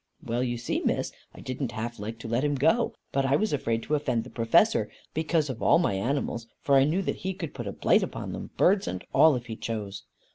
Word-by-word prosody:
Well 120 +2 -1
you 120 -1 -1
see, 115 - -2
Miss, - - 0 0.2
I - - -11
didn't 130 -1 -4
half 115 0 -4
like 110 +3 -5
to - - -6
let 120 +4 0
him 145 -1 +1
go, 225 - +2 0.2
but 135 - +1
I 135 +1 +3
was 215 +3 +1
afraid 115 -5 -1
to 150 - -3
offend 130 -6 +1
the 125 - -12
Professor, 115 -1 +3 0.2
because 160 0 +1
of 130 -4 -5
all - - +5
my 170 - +1
animals, 120 +2 -2
for 140 - 0
I 135 0 +6
knew 170 +7 +1
that - - -2
he 190 0 -3
could 165 -6 -6
put 120 -5 -6
a - - -2
blight - - +3
upon - - -4
them, - - -6
birds 195 +2 +3
and 90 - -4
all, 155 -3 +6
if 120 -1 -4
he 115 - -6
chose. 105 -3 -5
130 Hz, 245 wpm, -27 LUFS, 115-150 Hz, 0.2 s, I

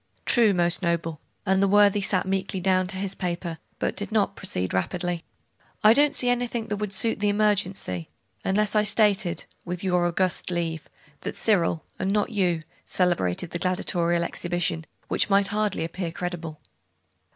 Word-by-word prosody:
'True, 230 -4 +4
most 175 -1 +3
noble,' 170 -3 -1 0.2
and 190 -1 +2
the 195 - +4
worthy 205 0 +5
sat 195 -2 +1
meekly 190 0 -2
down 185 0 +2
to 190 0 -4
his 195 0 -3
paper.... 170 -2 -4 0.2
but - - -2
did 205 - -4
not 205 -2 +1
proceed 95 - -3
rapidly. 175 - -2 0.6
'I 215 +1 +8
don't 290 +3 +4
see 250 - +2
anything 245 -2 0
that 205 - -1
would 210 -1 -3
suit 225 +4 +2
the 205 0 +2
emergency, 200 - 0 0.3
unless 210 +2 +1
I 210 - +5
stated, 210 -3 +2 0.2
with 180 +1 -5
your 180 -2 +2
august 185 +1 0
leave, 165 -3 -3 0.3
that - - -5
Cyril, 175 -6 +1
and 190 - 0
not 210 +3 0
you, 180 -6 0 0.2
celebrated 175 - 0
the 170 - -3
gladiatorial 175 -1 +1
exhibition; 175 -1 -2 0.2
which - - +1
might 200 -1 +4
hardly 210 -4 -1
appear 170 +1 -4
credible? 170 -3 -5
185 Hz, 160 wpm, -25 LUFS, 170-205 Hz, 0.6 s, I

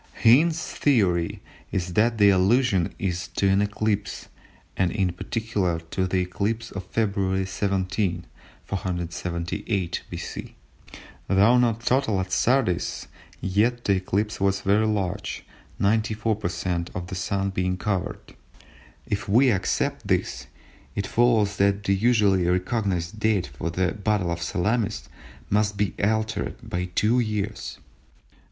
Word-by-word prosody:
Hind's 155 +8 +5
theory 95 - +1 0.3
is 90 -1 -2
that 115 +4 +2
the 100 -1 +6
allusion 95 0 +2
is 90 -3 -2
to 100 - +3
an 95 +1 +3
eclipse 105 0 -2 0.5
and 90 -2 +1
in 95 -3 0
particular 100 -3 -1
to 95 -1 0
the 95 0 +1
eclipse 110 +5 -2
of 100 -2 -6
February 100 -3 0
17, 95 -2 -1 0.4
478 90 +1 -3
B.C. - - -7 0.7
Though 105 +6 +5
not 115 -2 +1
total 125 -5 +1
at 95 0 -3
Sardis 120 -5 +1 0.3
yet 115 +6 +1
the 100 - +4
eclipse 100 +3 -2
was 95 0 +2
very 105 +3 +3
large, 100 -4 -2 0.3
94/100ths 105 -5 0
of 90 0 -3
the 95 - -8
Sun 100 +1 -1
being 90 0 -1
covered. 100 +2 -3 0.7
If 100 0 -3
we 125 +5 +5
accept 95 -4 -1
this, - - -1 0.5
it 100 - -1
follows 110 -4 +2
that 100 +1 +2
the 100 - +2
usually 100 -4 +3
recognised 90 0 -1
date 110 -4 +2
for 85 - -5
the 90 +1 0
battle 105 -3 0
of 85 0 -3
Salamis 105 +5 -1 0.4
must 105 0 +2
be 100 -1 0
altered 110 +1 0
by 90 +1 -2
two 105 +7 +2
years. 105 -2 -3
100 Hz, 125 wpm, -25 LUFS, 90-110 Hz, 0.7 s, the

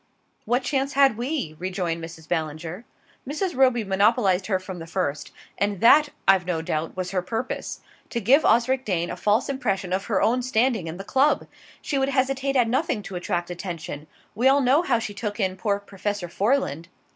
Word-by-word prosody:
"What 245 +4 +1
chance 275 +1 -1
had 275 -4 +5
we?" 245 - -3
rejoined 180 -2 -2
Mrs. 160 -1 -10
Ballinger. 160 +4 -3 0.4
"Mrs. 345 +4 -2
Roby 255 -3 +3
monopolised 195 -1 +2
her 195 -3 +2
from 185 -1 -8
the 165 - -8
first. 160 -5 -2 0.3
And 200 -1 0
that, 290 +6 +6 0.2
I've 185 -2 +4
no 165 -3 -1
doubt, 160 +2 -3
was 185 -1 -3
her 185 -2 0
purpose 225 +7 -4 0.3
to 235 - -2
give 260 +8 +4
Osric 250 +3 +3
Dane 175 -6 -1
a - - -4
false 210 +5 +1
impression 195 -9 -2
of 190 +1 -1
her 205 -5 +1
own 245 +3 +2
standing 240 -6 +1
in 160 +2 -6
the 195 - -6
club. 270 +8 +2 0.4
She 280 - -1
would 270 0 +1
hesitate 270 0 0
at 245 -3 +4
nothing 260 -2 0
to 195 - -8
attract 175 -1 -2
attention: 170 -4 -6 0.3
we 245 +4 +2
all 275 +1 +5
know 270 +5 +4
how 270 -9 +1
she 220 -2 -4
took 205 +1 -4
in 190 -2 0
poor 200 +1 -1
Professor 200 -1 -4
Foreland." 180 - 0
205 Hz, 190 wpm, -24 LUFS, 180-255 Hz, 0.4 s, that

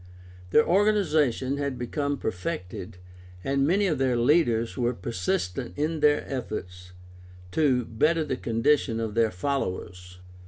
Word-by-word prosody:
Their 150 - +5
organization 160 - +2
had 140 -2 -2
become 140 +4 -2
perfected, 90 -3 -5 0.5
and 140 0 +1
many 200 +5 +3
of 155 -8 0
their 130 -2 +2
leaders 120 -3 +2
were 120 -1 0
persistent 90 -4 -3
in 155 +2 -1
their 150 0 +3
efforts 90 -8 -6 0.6
to 130 -4 +2
better 160 +10 +1
the 140 -3 -2
condition 115 0 +1
of 110 -2 -3
their 115 0 +3
followers. 90 -5 -4
130 Hz, 125 wpm, -26 LUFS, 110-150 Hz, 0.6 s, Their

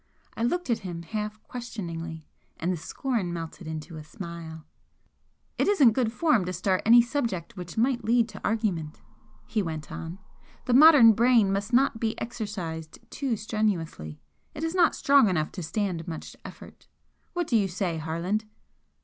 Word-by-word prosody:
I - - -6
looked 265 +5 0
at 230 - +1
him 175 -3 -6
half 210 +4 -4
questioningly, 170 -10 -6 0.3
and 175 +3 -1
the - - -3
scorn 195 - -2
melted 165 0 -6
into 160 +1 -6
a 155 - -8
smile. 165 -3 -8 0.9
"It - - +2
isn't 300 - +6
good 225 -1 0
form 275 - +2
to 180 - -3
start 185 +1 0
any 235 +1 +8
subject 235 - -3
which 180 -1 -8
might 240 +1 +1
lead 230 +1 +3
to - - -10
argument," 195 -9 -1 0.5
he 215 - -1
went 160 -5 -5
on 165 +2 -6 0.5
"The 250 - +1
modern 270 -5 +9
brain 230 -3 +4
must 200 +3 -2
not 250 -2 +3
be 225 -1 -2
exercised 185 -9 -5
too 265 -5 -2
strenuously, 185 - -2 0.4
it 300 - -5
is 325 +1 -1
not 355 -3 +4
strong 275 -6 +5
enough 155 -4 0
to 185 - -6
stand 170 0 -2
much 160 -2 -7
effort. - - -12 0.5
What 350 -1 -1
do 245 - 0
you 205 -3 +3
say, 175 -2 -2
Harland?" 170 +7 -2
205 Hz, 165 wpm, -27 LUFS, 165-235 Hz, 0.9 s, modern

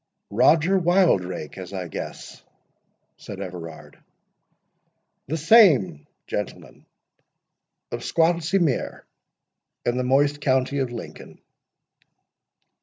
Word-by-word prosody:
"Roger 160 - +3
Wildrake, 100 - +1
as 95 +1 -9
I 95 -2 -4
guess?" 80 - -8 0.7
said - - -9
Everard. 85 -3 -9 1.3
"The 160 +5 -2
same—Gentleman; 155 - +1 1.0
of - - -4
Squattlesea 170 +3 +1
mere, 150 -7 -2 0.8
in 120 +1 0
the 125 - 0
moist 145 +3 +2
county 130 0 +1
of 130 -3 -2
Lincoln." 120 - -10
135 Hz, 85 wpm, -23 LUFS, -, 1.3 s, Roger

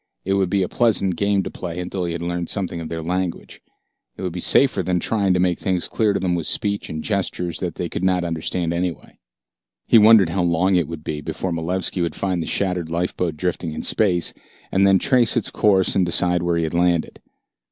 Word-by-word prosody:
It 95 - 0
would 95 -2 +1
be 100 0 +1
a - - -1
pleasant 100 -6 +1
game 100 +2 +1
to - - -6
play 90 -1 -6
until 90 0 -3
he 85 - -3
had 85 0 -5
learned 85 0 -3
something 90 -4 -3
of 80 - -6
their 80 -1 -4
language. 90 +1 -3 0.6
It - - -7
would 90 -2 -3
be 90 - -5
safer 125 +2 +4
than 90 0 0
trying 100 -2 +1
to - - +1
make 90 -1 +1
things 95 -3 -1
clear 110 -2 +1
to - - -1
them 90 -2 0
with 85 -3 -1
speech 100 -1 -1
and 80 0 -5
gestures 90 -4 -1
that - - -4
they - - -3
could - - -5
not 90 -1 +2
understand 85 0 -2
anyway. 85 0 -4 0.7
He 115 - +6
wondered 105 -4 +6
how 90 +3 -1
long 90 +2 +2
it 85 -5 +1
would 80 -2 -7
be 75 -1 -4
before 95 +5 -4
Malevski 90 +2 -2
would 85 - -2
find 95 -3 -1
the - - -4
shattered 90 -4 -1
lifeboat 85 -1 -2
drifting 85 -1 -2
in - - -5
space, 90 -6 +1 0.4
and 95 +1 +3
then 95 0 +5
trace 125 +4 +2
its 115 - -1
course 95 -3 +2
and 95 - +3
decide 90 0 0
where 85 -1 0
he 85 - 0
had 80 - -3
landed. 85 -1 0
90 Hz, 225 wpm, -21 LUFS, 85-95 Hz, 0.7 s, He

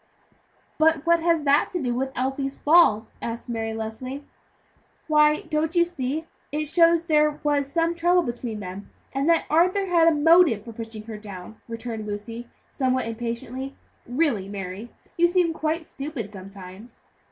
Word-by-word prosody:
"But 320 -1 +3
what 340 0 +4
has 330 -2 +2
that 285 0 +3
to 355 - -1
do 250 -5 -1
with 265 +2 -2
Elsie's 270 +2 -2
fall?" 290 -9 +4 0.2
asked 235 +1 -5
Mary 225 -1 -2
Leslie. 225 +5 -5 0.8
"Why, 300 -1 +4
don't 315 +1 -1
you 345 0 +5
see 305 -3 -3
that 325 - -25 0.2
it 305 +1 -1
shows 335 +1 +4
there 300 -2 +2
was 285 -2 0
some 335 +1 +1
trouble 350 +1 +3
between 235 -4 -5
them, 190 +1 -8 0.2
and 275 +4 0
that 335 -1 +3
Arthur 365 +5 +3
had 340 -3 +4
a - - +7
motive 300 - +5
for 230 - -8
pushing 225 -1 -7
her 215 -1 -8
down," 200 0 -10
returned 230 -2 -5
Lucy, 230 +3 -6 0.2
somewhat 260 -2 0
impatiently. 240 +3 -5 0.3
"Really, 245 -7 0
Mary, 195 +3 -6 0.3
you 345 0 +5
seem 350 -2 +2
quite 315 +1 -2
stupid 270 -9 -6
sometimes." 195 +2 -12
270 Hz, 160 wpm, -24 LUFS, 225-325 Hz, 0.8 s, a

